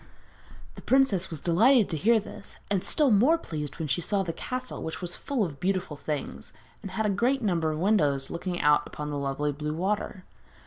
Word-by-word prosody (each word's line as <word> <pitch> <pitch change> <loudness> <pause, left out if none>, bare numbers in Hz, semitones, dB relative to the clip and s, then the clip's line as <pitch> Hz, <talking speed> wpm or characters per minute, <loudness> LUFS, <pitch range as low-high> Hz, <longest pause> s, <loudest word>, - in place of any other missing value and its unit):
The - - -11
princess 260 -9 +2
was 160 -4 -5
delighted 220 +7 +4
to - - -1
hear 220 +8 +3
this, 210 - -10 0.2
and 195 -3 +1
still 295 -5 +3
more 250 +11 +5
pleased 150 - -6
when 160 -2 -3
she 145 +5 0
saw 195 +3 0
the 165 -3 -4
castle, 255 +6 -5
which 160 0 -5
was 175 -2 -4
full 275 -6 -1
of 145 -5 -8
beautiful 185 -3 -1
things, 150 0 -5 0.3
and 195 - -7
had 215 +4 -2
a - - +2
great 245 +6 +1
number 170 -6 +1
of 155 - -3
windows 150 -8 +1
looking 175 +1 -3
out 150 0 +2
on 150 0 -3
the 145 - -3
lovely 140 +1 -1
blue 150 +2 -4
water. 190 +1 -2
180 Hz, 205 wpm, -27 LUFS, 150-215 Hz, 0.3 s, more